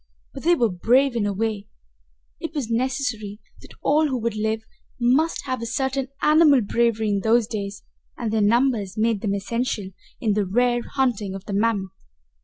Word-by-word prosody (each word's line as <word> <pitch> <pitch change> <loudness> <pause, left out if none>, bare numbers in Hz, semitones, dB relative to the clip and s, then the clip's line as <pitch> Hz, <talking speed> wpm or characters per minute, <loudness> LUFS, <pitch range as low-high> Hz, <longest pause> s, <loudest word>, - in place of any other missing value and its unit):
But 270 - -8
they 345 +2 +4
were 235 - +1
brave 245 +8 +2
in 210 -3 0
a - - 0
way 210 0 -2 0.7
it 315 - -6
was 255 -6 -3
necessary 230 -4 -2 0.2
that - - -15
all 305 +2 +3
who 265 -3 -1
would 230 -1 -2
live 220 +1 -1 0.4
must 270 +8 +2
have 255 -3 -3
a 230 - -3
certain 265 +2 -1 0.2
animal 300 -3 +6
bravery 225 0 +1
in 200 -1 +1
those 225 +3 +3
days 205 -2 -5 0.3
and 230 -3 -3
their 220 - +2
numbers 220 -2 +2
made 220 -2 +1
them 200 -3 0
essential 210 -1 -2 0.3
in 220 -3 +1
the 210 0 +1
rare 240 +4 +2
hunting 225 -8 0
of 195 +1 -8
the 205 - -5
mammoth. 200 -2 0
230 Hz, 180 wpm, -23 LUFS, 205-255 Hz, 0.7 s, animal